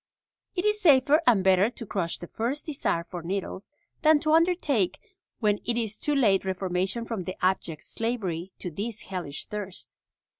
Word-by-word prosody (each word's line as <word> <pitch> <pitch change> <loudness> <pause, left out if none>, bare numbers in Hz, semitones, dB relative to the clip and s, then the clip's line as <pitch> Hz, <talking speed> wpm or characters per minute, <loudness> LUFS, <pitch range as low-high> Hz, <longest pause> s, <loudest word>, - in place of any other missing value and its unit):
It 360 +2 -1
is 420 0 +2
safer 290 -2 +6
and 215 -6 +5
better 190 +2 +5
to 240 -1 -8
crush 180 -5 -2
the - - -8
first 240 - -3
desire 275 - -1
for 175 0 -7
needles 190 +3 -4 0.3
than 310 -1 +6
to 310 - +2
undertake 320 - +2 0.4
when 210 -2 +2
it 235 0 0
is 220 -3 -2
too 295 - +1
late 205 -8 +4
reformation 190 +3 -1
from 220 -6 -4
the 185 - -4
abject 175 -5 0
slavery 195 -7 -3
to 180 - -5
this 215 +6 -4
hellish 180 -7 -5
thirst. 200 -3 -6
210 Hz, 165 wpm, -27 LUFS, 185-260 Hz, 0.4 s, safer